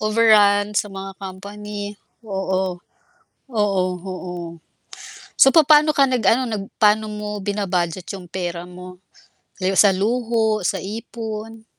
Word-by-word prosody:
overruns 210 -2 +4
sa 210 - -7
mga 195 0 -7
company. 205 +2 -7 0.3
Oo, 190 -2 -2 0.7
oo, 205 -5 +1 0.2
oo. 185 -1 -6 1.1
So, - - +9
papa'no 305 -1 +6
ka 275 - +6
nag 255 -3 +1
ano, 255 +3 +4
nag 215 -5 -3
pa'no 215 0 +3
mo 210 0 -5
bina-budget 185 -4 -2
'yung 185 -3 -9
pera 175 -1 -5
mo 180 0 -11 0.6
gaya 190 +1 0
sa 200 -2 +7
luho, 220 0 0
sa 190 - -1
ipon? 220 +1 -7
205 Hz, 120 wpm, -21 LUFS, 190-220 Hz, 1.1 s, So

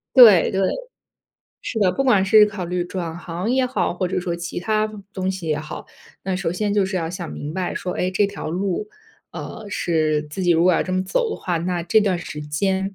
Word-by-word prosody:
对， 220 -9 +9
对， 190 - 0 1.0
是 225 - -3
的， 190 -3 +4
不 270 +9 -1
管 235 -7 +4
是 210 +3 +7
考 200 -4 -4
虑 175 0 -1
转 175 -2 -5
行 175 +5 -4
也 260 +1 +3
好， 210 -10 -1
或 185 0 -1
者 185 - -1
说 175 -1 -3
其 175 +1 -5
他 215 +2 +1 0.3
东 190 -1 -2
西 185 -3 -6
也 150 - +1
好， 155 - -7 0.4
那 190 -1 -1
首 175 -3 -1
先 205 +2 -1
就 200 -2 +3
是 190 -1 -2
要 165 -2 -2
想 175 -1 -6
明 150 +2 -6
白 185 -1 -2
说， 180 - -3
诶， 180 - 0
这 200 +2 +2
条 200 -5 -6
路， 190 - -2 0.4
呃， 225 -1 -7
是 155 -5 +1
自 185 +6 -5
己 175 - +2
如 165 0 +4
果 185 - +5
要 - - +2
这 185 - -4
么 185 0 +1
走 450 - 0
的 - - -3
话， 175 -2 -1
那 175 +1 -2
这 175 +6 +3
段 190 -4 +1
时 150 -3 -7
间， 190 +6 -1
185 Hz, 245 characters per minute, -22 LUFS, 175-200 Hz, 1.0 s, 对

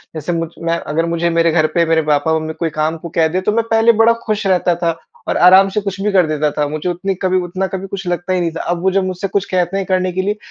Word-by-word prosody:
जैसे 155 +3 -3
मुझ 165 -1 -2
मैं 165 0 -1
अगर 160 +2 -2
मुझे 170 0 0
मेरे 165 0 +2
घर 160 -1 +2
पे 170 -1 +3
मेरे 165 0 +2
पापा-मम्मी 155 +1 0
कोई 165 - 0
काम 155 +2 0
को 170 +1 -8
कह 160 -1 +2
दे 180 +4 -2
तो 200 - 0
मैं 230 +2 +1
पहले 225 +1 +5
बड़ा 230 +1 +5
खुश 215 -2 -2
रहता 180 -2 +2
था 165 -1 -1 0.3
और - - 0
आराम 190 +2 +6
से 210 +2 -2
कुछ 195 -1 -5
भी 210 +1 0
कर 185 -4 +3
देता 155 -1 0
था। 145 0 -1
मुझे 155 +4 -3
उतनी 180 +3 -2
कभी 185 -1 +2
उतना 185 +2 -3
कभी 190 0 -5
कुछ 195 0 -6
लगता 175 +1 -2
ही 185 - +1
नहीं 170 -1 -1
था। 165 - -5
अब 175 -1 -2
वो 190 - +3
जब 195 0 +1
मुझसे 185 +1 -3
कुछ 200 0 -1
कहते 180 +1 0
हैं 195 - -2
करने 185 -1 0
के 185 +1 -1
लिए, 205 +3 -2
175 Hz, 285 wpm, -17 LUFS, 165-190 Hz, 0.3 s, आराम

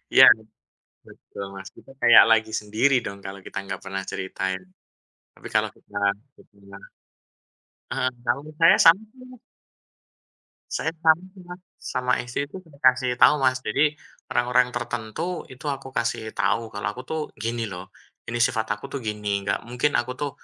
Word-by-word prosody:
Iya, - - +10 0.8
betul 100 - -10
Mas, 95 -1 -8
kita - - -17
kayak 120 -1 +9
lagi 110 0 +3
sendiri 110 +6 +2
dong, 100 0 -6
kalau 95 +1 -7
kita - - -8
nggak 95 -1 -5
pernah 95 0 -4
ceritain. 95 0 -3 0.7
Tapi - - -10
kalau - - +2
kita - - -28 0.4
nggak - - -21
pernah 100 -1 -15 1.1
Heeh, 130 - 0
kalau 145 +4 -1
saya 165 - +7
sama 170 +6 +7
sih 255 -1 -15
Mas. 250 - -14 1.3
Saya 160 - -1
sama 160 +2 +5
sih 185 - -13
Mas, 180 +1 -10 0.3
sama 125 -1 0
istri 125 +2 -3
itu - - -10
dikasih 130 -4 +2
tahu - - +8
Mas. 130 -1 +3
Jadi, 145 +6 +1 0.4
orang-orang 125 +1 +3
tertentu 120 - -4
itu 130 +3 -14
aku 135 -1 -5
kasih 115 -3 -2
tahu 115 -1 0
kalau 100 - -3
aku 125 - -8
tuh, 160 +3 -3 0.2
"Gini 115 +1 -3
loh, 90 0 -9 0.4
ini 120 +1 -2
sifat 115 -2 +2
aku 105 - -16
tuh 140 - -2
gini, 105 -2 -2
nggak 100 - 0
mungkin 125 +4 0
aku 120 +1 -5
tuh 145 -1 -3
120 Hz, 160 wpm, -24 LUFS, 105-140 Hz, 1.3 s, Iya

